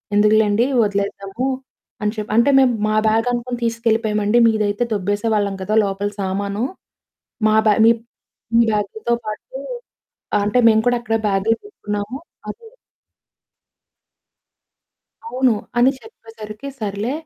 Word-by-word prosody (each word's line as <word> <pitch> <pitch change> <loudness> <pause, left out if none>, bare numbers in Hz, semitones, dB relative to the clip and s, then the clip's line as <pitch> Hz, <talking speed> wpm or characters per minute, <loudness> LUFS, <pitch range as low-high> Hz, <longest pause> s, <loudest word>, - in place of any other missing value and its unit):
ఎందుకులెండి, 210 +2 +4 0.2
వదిలేద్దాము" 200 +4 -2 0.6
అని 210 +1 0
చెప్పారు. 215 0 -3
అంటే, 280 +4 +5
"మేము 255 -2 +4
మా 215 - 0
బ్యాగ్ 225 +2 +2
అనుకుని 240 0 -3
తీసుకెళ్లిపోయామండి. 225 -1 +1
మీదైతే 215 +1 0
దొబ్బేసేవాళ్లం 205 0 0
కదా! 215 +3 -1
లోపల 200 +1 -2
సామాను, 200 +3 -2 0.9
మా 215 - +3
బ్యాగ్ 210 +1 +4
మీప్ 230 0 +3 0.5
మీ 235 - +6
బ్యాగ్‌తో 215 +3 -1
పాటు - - -6 0.9
అంటే, 210 +4 +2
మేము 220 0 +4
కూడా 245 0 +3
అక్కడే 225 -1 -1
బాగ్లు 200 +4 +1
పెట్టుకున్నాము 210 - -5 0.3
అది" 470 - -9 2.6
"అవును" 260 - +2 0.3
అని 255 +3 +5
చెప్పేసరికి, 225 - -11
"సర్లే, 210 +3 -3
215 Hz, 110 wpm, -20 LUFS, 205-235 Hz, 2.6 s, మీ